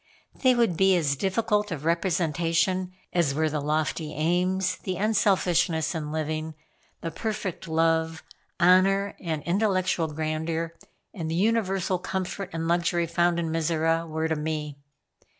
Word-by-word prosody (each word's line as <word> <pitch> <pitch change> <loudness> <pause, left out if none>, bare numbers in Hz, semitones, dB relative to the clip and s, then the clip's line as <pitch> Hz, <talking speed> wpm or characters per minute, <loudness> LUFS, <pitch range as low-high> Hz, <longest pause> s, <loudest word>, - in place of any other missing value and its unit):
They 255 -2 +3
would 230 -7 +2
be 190 +2 +4
as 150 -5 +1
difficult 210 +5 0
of 155 -4 -5
representation 170 +1 +1 0.2
as 165 -6 +2
were 155 0 +1
the 150 - -1
lofty 155 +1 -1
aims, 180 +4 +1
the 185 - -4
unselfishness 185 -6 +2
in 150 -3 -4
living, 155 0 -3 0.5
the 165 - -4
perfect 210 -1 -4
love, 160 0 +1 0.4
honor 195 +3 +4
and 160 -4 -3
intellectual 185 -3 +1
grandeur, 160 +2 -2 0.4
and 165 -7 -4
the 165 - -1
universal 195 -2 +1
comfort 190 +1 -4
and 165 -1 -3
luxury 170 0 +1
found 170 +1 +1
in 165 -1 -2
Mizora, 165 0 +1
were 160 0 -1
to 160 - 0
me. 150 -2 -4
170 Hz, 135 wpm, -26 LUFS, 160-185 Hz, 0.5 s, be